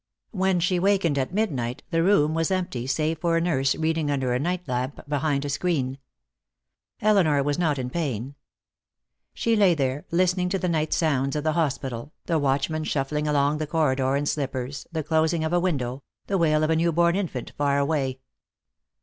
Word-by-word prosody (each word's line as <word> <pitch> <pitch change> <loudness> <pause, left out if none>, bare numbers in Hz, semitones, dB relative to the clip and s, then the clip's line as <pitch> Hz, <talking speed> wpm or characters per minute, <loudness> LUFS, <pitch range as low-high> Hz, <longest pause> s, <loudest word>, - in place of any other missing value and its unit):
When 190 -3 +1
she 180 +1 +1
wakened, 185 -6 +2
at 130 - -2
midnight, 135 - -2
the 165 -1 +2
room 165 -5 +3
was 165 0 0
empty 180 -10 -2
save 155 +4 0
for 170 0 +1
a - - +3
nurse 140 -6 +1
reading 160 -1 0
under 135 -3 0
a 125 - +1
night 175 +3 -2
lamp 125 +2 -2
behind 145 -1 0
a - - -3
screen. 140 -4 -1 1.0
Elinor 180 -10 +3
was 145 +3 -1
not 155 -5 +1
in 125 -1 -4
pain. 135 -6 -3 1.0
She 230 -1 +1
lay 195 -5 +4
there, 135 0 -1
listening 180 +1 +1
to 195 - 0
the 185 - -2
night 155 -2 0
sounds 140 -4 +1
of 150 - -1
the 155 0 +1
hospital, 140 -4 -2
the 165 -2 +1
watchman 145 +3 0
shuffling 150 +1 -1
along 145 0 +2
the 155 - -2
corridor 135 -4 +1
in 145 +1 0
slippers, 135 -2 -3
the 160 -2 -2
closing 160 +2 +1
of 160 +2 -1
a 175 - +4
window, 140 -7 -1 0.2
the 195 -1 0
wail 155 -2 +3
of 155 - +2
a - - +3
newborn 170 +1 +2
infant 170 -11 -3
far 140 -1 +1
away. 140 -3 -1
155 Hz, 185 wpm, -25 LUFS, 140-170 Hz, 1.0 s, lay